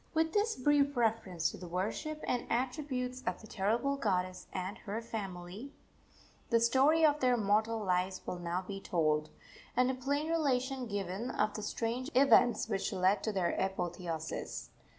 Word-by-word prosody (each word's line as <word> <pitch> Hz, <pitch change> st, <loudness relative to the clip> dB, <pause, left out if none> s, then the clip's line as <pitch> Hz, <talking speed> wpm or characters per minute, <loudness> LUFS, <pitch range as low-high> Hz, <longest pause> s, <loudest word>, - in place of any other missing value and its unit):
With 320 Hz, 0 st, +2 dB
this 430 Hz, +2 st, +2 dB
brief 285 Hz, +1 st, +2 dB
reference 215 Hz, -8 st, +1 dB
to -, -, -9 dB
the 180 Hz, -, -8 dB
worship 215 Hz, -, -3 dB
and 245 Hz, -1 st, -1 dB
attributes 255 Hz, 0 st, -2 dB
of 180 Hz, -, -1 dB
the -, -, -12 dB
terrible 230 Hz, +8 st, 0 dB
goddess 185 Hz, -7 st, -1 dB
and 185 Hz, +1 st, -4 dB
her 210 Hz, +2 st, -4 dB
family, 205 Hz, +2 st, -6 dB, 0.8 s
the 230 Hz, -, +4 dB
story 270 Hz, +7 st, +4 dB
of 300 Hz, -1 st, +3 dB
their 250 Hz, -2 st, +3 dB
mortal 220 Hz, +2 st, +2 dB
lives 185 Hz, 0 st, 0 dB
will 180 Hz, -, -4 dB
now 175 Hz, +2 st, -2 dB
be 195 Hz, -1 st, -5 dB
told, 155 Hz, -5 st, +1 dB, 0.5 s
and 250 Hz, +1 st, +4 dB
a -, -, -3 dB
plain 285 Hz, +4 st, -1 dB
relation 270 Hz, -5 st, 0 dB
given 200 Hz, +2 st, -3 dB
of 210 Hz, -3 st, 0 dB
the 215 Hz, -, -4 dB
strange 235 Hz, +5 st, -2 dB
events 255 Hz, -3 st, +5 dB
which 200 Hz, -3 st, -1 dB
led 190 Hz, +1 st, +2 dB
to 220 Hz, -, -1 dB
their 185 Hz, -4 st, +1 dB
apotheosis. 175 Hz, -4 st, -3 dB
225 Hz, 160 wpm, -33 LUFS, 185-260 Hz, 0.8 s, events